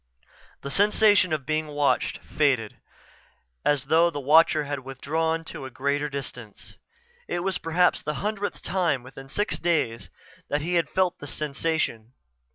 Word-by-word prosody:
The 140 - -5
sensation 205 0 +4
of 150 -4 -1
being 155 +2 -1
watched 145 -1 +1
faded, 130 -8 0 0.8
as 145 -3 +2
though 165 +4 +4
the 145 -4 -5
watcher 155 +2 +5
had 145 -1 -3
withdrawn 160 +5 -2
to 140 - -7
a - - -6
greater 140 +3 -1
distance. 125 -6 -8 0.5
It 175 - -2
was 190 -1 -1
perhaps 175 +2 +2
the 150 0 -3
hundredth 205 +2 -3
time 175 -8 0
within 135 +1 -11
six 205 +8 -1
days 155 -10 0 0.4
that 145 - 0
he 170 +4 -2
had 170 -1 +2
felt 185 -2 0
the 145 - -8
sensation. 145 -6 -2
150 Hz, 150 wpm, -26 LUFS, 135-170 Hz, 0.8 s, watcher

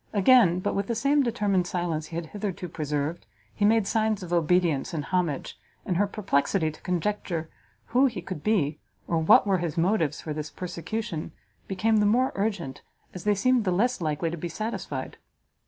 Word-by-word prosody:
Again, 200 -4 +5
but - - -1
with 200 0 -1
the 235 - -1
same 280 +5 +3
determined 205 -7 +1
silence 170 -4 -2
he 165 - -9
had 170 0 -3
hitherto 190 0 -5
preserved, 150 +1 -3 0.3
he 210 - -3
made 220 0 +4
signs 215 -2 0
of 175 -1 -5
obedience 170 -2 +2
and 150 -3 -3
homage, 175 -7 -2 0.3
and 180 - 0
her 205 +2 +3
perplexity 185 -4 0
to 155 - -16
conjecture 180 -3 -2 0.4
who 255 +4 +4
he 225 -7 -4
could 175 -3 -6
be, 155 -8 +1 0.3
or 165 - +1
what 160 - +6
were 195 -2 +2
his 170 -1 -3
motives 170 -3 +1
for 155 - -5
this 150 0 -5
persecution, 180 0 -5 0.3
became 215 +4 +1
the 210 -1 +4
more 250 +5 +3
urgent 195 -9 -2 0.3
as 180 0 -8
they 210 -1 +3
seemed 250 +4 +3
the 195 - 0
less 235 +5 +1
likely 160 +1 -1
to 170 - -4
be 170 +2 -4
satisfied. 220 +6 -4
185 Hz, 185 wpm, -26 LUFS, 165-215 Hz, 0.4 s, what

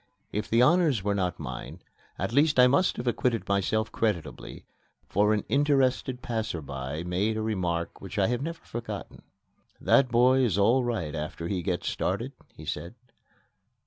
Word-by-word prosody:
If 105 +1 -3
the 115 +2 +4
honors 150 - +3
were 105 0 +1
not 90 -3 -1
mine, 65 -5 -7 0.3
at - - -3
least 145 +2 +4
I 125 - +9
must 140 +9 +3
have 120 - -4
acquitted 120 -1 0
myself 110 +3 0
creditably, 85 -10 -3 0.4
for 105 +2 +2
an 105 -2 +1
interested 135 -3 +1
passer 110 -7 -2
by 70 +2 -5
made 95 +5 0
a - - -1
remark 90 -6 -2
which 95 +2 -8
I 100 - +4
have 125 +1 -1
never 165 +3 -5
forgotten. 110 -3 -7 0.6
"That 130 -2 +4
boy 125 +2 +4
is 115 -8 +2
all 115 +6 +4
right 110 -11 -2
after 80 +2 -4
he 95 -1 -1
gets 85 0 -2
started," - - -1 0.2
he - - -11
said. 85 +7 -5
110 Hz, 165 wpm, -27 LUFS, 90-125 Hz, 0.6 s, I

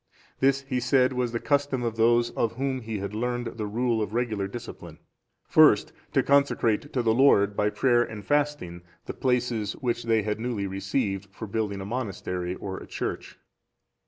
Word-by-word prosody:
This, 135 +1 +3
he 135 -2 -2
said, 125 +1 +3
was 125 -2 -1
the 115 - -2
custom 140 -3 0
of 115 -2 -2
those 120 +1 +3
of 115 - -1
whom 130 +1 -2
he 110 -1 -4
had 100 +1 -5
learned 120 +2 -2
the 105 - -2
rule 115 +1 0
of 105 +1 -3
regular 110 -5 -1
discipline, 120 +4 -9 0.5
first - - +5 0.2
to - - +3
consecrate 140 -2 +2
to 125 - 0
the 110 -1 +3
Lord, 105 -6 +4
by 105 +1 +2
prayer 120 +3 +2
and 105 -4 -5
fasting, 145 -13 -1 0.2
the - - -5
places 120 -5 0
which 120 -2 -3
they 115 -2 +2
had 105 +1 -2
newly 115 -4 -2
received 95 +1 -2
for 110 - -7
building 100 -2 -2
a - - -5
monastery 95 -6 -3
or 95 0 -6
a - - -11
church. - - -5
115 Hz, 180 wpm, -26 LUFS, 105-125 Hz, 0.5 s, first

